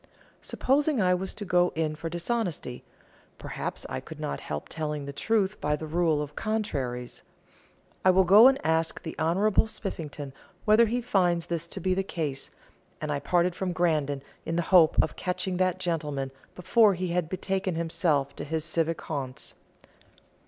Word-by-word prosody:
Supposing 285 +1 +1
I 180 -2 +4
was 185 +1 -2
to 205 - -6
go 180 -1 +3
in 160 -1 0
for 165 +2 -5
dishonesty, 175 - -3 0.5
perhaps - - -5
I - - -4
could - - -11
not 70 - -3
help 75 0 -5
telling 150 -2 -4
the 140 - -6
truth 210 +4 0
by 150 0 +1
the 155 - -6
rule 160 -2 +1
of 150 0 -9
"contraries." 135 - -3 0.8
I 185 - +5
will 190 +1 +6
go 205 +7 +8
and 270 0 +4
ask 160 0 +1
the 160 - -6
Honourable 195 +7 +3
Spiffington 150 -10 -6 0.3
whether 220 +2 +6
he 245 +3 -1
finds 180 -8 +1
this 170 -1 -3
to 195 - -3
be 185 +1 +1
the 190 - +1
case, 150 -8 -4 0.5
and 155 -1 -3
I 145 - 0
parted 175 +3 +2
from 180 0 -3
Grandon 155 -6 0 0.2
in 165 - -3
the 175 - +1
hope 165 -3 +7
of 155 - -4
catching 180 0 -2
that 185 -1 +1
gentleman 150 -6 -2 0.2
before 205 +3 +4
he 180 0 -3
had 170 -2 0
betaken 190 0 -2
himself 165 -4 0
to - - -4
his 160 +1 -2
civic 165 0 -1
haunts. 135 -4 -5
170 Hz, 170 wpm, -27 LUFS, 150-190 Hz, 0.8 s, go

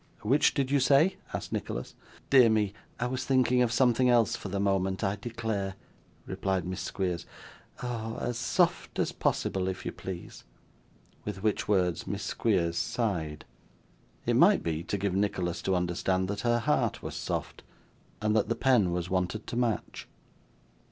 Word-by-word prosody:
'Which 135 +8 +3
did 135 -2 0
you 140 - +4
say?' 145 +8 +4
asked - - -5
Nicholas. - - -4 0.4
'Dear 130 -4 +7
me, 105 -2 +1 0.3
I 125 - 0
was 130 +1 -2
thinking 130 -2 +3
of 120 -2 +2
something 125 +1 +3
else 120 -4 +4
for 100 - -6
the 100 +1 -2
moment, 95 0 0
I 100 0 +1
declare,' 110 -3 -3 0.5
replied 95 -2 -1
Miss 90 +1 -4
Squeers. 90 -2 -3 0.6
'Oh! 115 -2 -3
as 120 0 -2
soft 115 - +1
as - - +1
possible, 95 -1 0
if 95 -1 -4
you - - -2
please.' 90 -2 -8 0.8
With 100 -2 -5
which 110 -2 0
words, 90 -4 +1
Miss 100 0 -3
Squeers 90 -7 0
sighed. 85 -6 -2 0.8
It - - +2
might - - +5
be, 80 -1 -1
to 100 - -1
give 100 -1 -1
Nicholas 95 -3 -1
to 95 - +1
understand 90 +1 0
that 100 0 -2
her 120 -1 +2
heart 115 - 0
was - - -5
soft, - - -4 0.6
and 105 0 +2
that 110 - +2
the - - +1
pen 120 -9 +3
was 90 0 -2
wanted 95 +3 -1
to - - -5
match. 120 -3 -2
100 Hz, 165 wpm, -29 LUFS, 95-120 Hz, 0.8 s, Dear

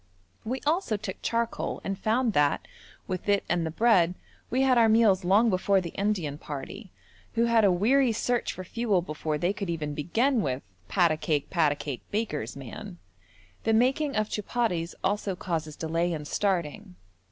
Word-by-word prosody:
We 255 +4 -3
also 305 - +1
took 205 -2 -6
charcoal 230 0 -1
and 195 - -2
found 225 +3 +1
that, 145 -3 +2 0.4
with 185 +1 -4
it 200 -1 +3
and 175 -1 +1
the 160 - -2
bread, 180 -2 +3 0.3
we 260 +3 +2
had 260 -1 +4
our 230 -2 +5
meals 215 -4 +4
long 210 +6 +4
before 195 +1 +2
the 170 -3 -5
Indian 185 -8 -1
party, 175 - -7 0.4
who 230 +1 +3
had 230 -1 +4
a 200 - +5
weary 240 +8 +3
search 240 +2 0
for 185 - -7
fuel 205 -2 0
before 155 -1 -3
they 175 +6 0
could 200 -3 -5
even 155 -3 -2
begin 230 - +1
with 130 -5 -2 0.2
'pat 175 -3 +3
a 155 - 0
cake, 150 -2 -1
pat 165 -5 +3
a - - -1
cake, 145 -3 -5
baker's 205 - -2
man.' 175 - -8 0.7
The 225 - +2
making 265 +5 +2
of 215 0 +1
chupatties 205 -6 -2
also 200 -1 0
causes 160 -5 -3
delay 165 +2 -1
in 150 -2 -5
starting. 170 - -2
195 Hz, 175 wpm, -27 LUFS, 165-225 Hz, 0.7 s, our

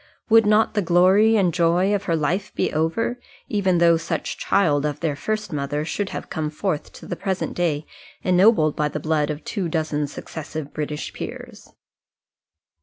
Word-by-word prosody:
Would 225 -1 +6
not 215 +1 +3
the 210 - +1
glory 190 +5 +4
and 185 -5 +2
joy 175 +4 +2
of 200 -1 -1
her 170 - +1
life 180 +6 -1
be - - 0
over, 165 +10 0 0.3
even 190 -4 +1
though 170 -1 +5
such 165 - -3
child 150 -8 +2
of 150 -1 -2
their 155 -4 -1
first 215 +6 -3
mother 145 +1 -2
should 200 +4 -2
have - - -6
come 155 -1 -3
forth 155 0 -3
to - - -12
the - - -4
present 190 0 -2
day 155 -4 -1 0.4
ennobled 180 -4 +4
by 150 - +1
the 150 - -4
blood 155 0 0
of 150 +1 -4
two 190 -6 -3
dozen 155 -2 -1
successive 155 0 -7
British 150 -1 -4
peers? - - -8
170 Hz, 175 wpm, -23 LUFS, 150-200 Hz, 0.4 s, Would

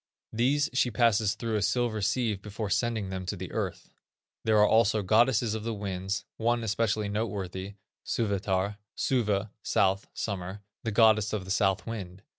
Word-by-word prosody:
These 135 +6 +2
she 130 -1 +2
passes 110 -3 +2
through 115 -1 -3
a - - -1
silver 115 0 0
sieve 105 -1 0
before 105 0 -5
sending 110 -2 0
them 95 -1 -4
to 100 - -2
the 90 0 -6
earth. - - -4 0.5
There 110 -1 +3
are 105 0 +6
also 110 -1 +3
goddesses 110 +2 +3
of 110 -1 -4
the 115 0 -2
winds, 100 0 -3
one 120 +1 +1
especially 110 -1 0
noteworthy, 100 -2 -3 0.3
Suvetar 100 -2 -1 0.2
(suve, 105 -5 0
south, 95 0 +1
summer), 95 0 -4 0.2
the 115 - -1
goddess 110 -1 +4
of 100 -3 -2
the 95 - -5
south 100 -2 +2
wind. 100 -4 -6
105 Hz, 160 wpm, -28 LUFS, 100-115 Hz, 0.5 s, are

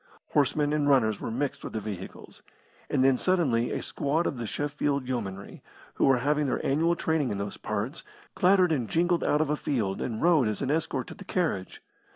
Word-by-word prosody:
Horsemen 145 +1 +2
and 145 -1 +1
runners 110 -7 +3
were - - -3
mixed 135 +5 -3
with - - -6
the 110 - -1
vehicles. 100 -3 -8 0.5
And 130 - +2
then 130 -1 +4
suddenly 140 -11 +2
a - - -3
squad 155 +5 -1
of 140 - -2
the 115 -2 -4
Sheffield 145 0 -1
Yeomanry, 100 -6 -5 0.3
who - - +1
were 135 -2 +5
having 145 +3 +1
their 130 - -2
annual 165 +5 +2
training 160 -5 0
in 100 - -2
those 100 0 -4
parts, 110 +8 -4 0.3
clattered 185 -1 +4
and 125 -8 -1
jingled 175 +1 +2
out 150 - +2
of 155 -2 0
a - - +2
field, 110 -10 -2
and 110 -3 -3
rode 160 -8 +4
as 105 +4 -2
an 135 - 0
escort 145 -5 -1
to - - -9
the 200 - -11
carriage. 170 - -2
140 Hz, 200 wpm, -27 LUFS, 115-155 Hz, 0.5 s, were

